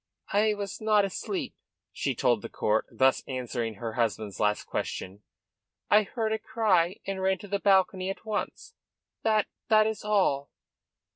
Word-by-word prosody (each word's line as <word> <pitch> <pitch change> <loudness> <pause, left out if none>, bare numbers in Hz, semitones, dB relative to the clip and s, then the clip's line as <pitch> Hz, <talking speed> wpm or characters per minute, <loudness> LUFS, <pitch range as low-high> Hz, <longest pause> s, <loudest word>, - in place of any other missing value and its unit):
"I 210 +1 +3
was 200 -1 -5
not 215 -2 +4
asleep," 195 - -4 0.4
she - - -2
told - - +2
the - - -7
court, 110 +1 0
thus 130 0 +3
answering 120 -3 -3
her 110 +2 -5
husband's 110 -5 -1
last 105 0 +1
question. 95 +2 -4 0.7
"I 210 - +7
heard 220 +1 -2
the 220 - 0
cry, 195 -6 +2
and 195 -1 -3
ran 190 0 +2
to 205 - -11
the 200 0 -1
balcony 190 -1 +3
at 195 - -6
once. 340 - -4 0.5
That 215 -2 +2 0.2
that 215 -1 +6
is 220 0 -2
all." 190 -10 +1
195 Hz, 155 wpm, -28 LUFS, 130-215 Hz, 0.7 s, I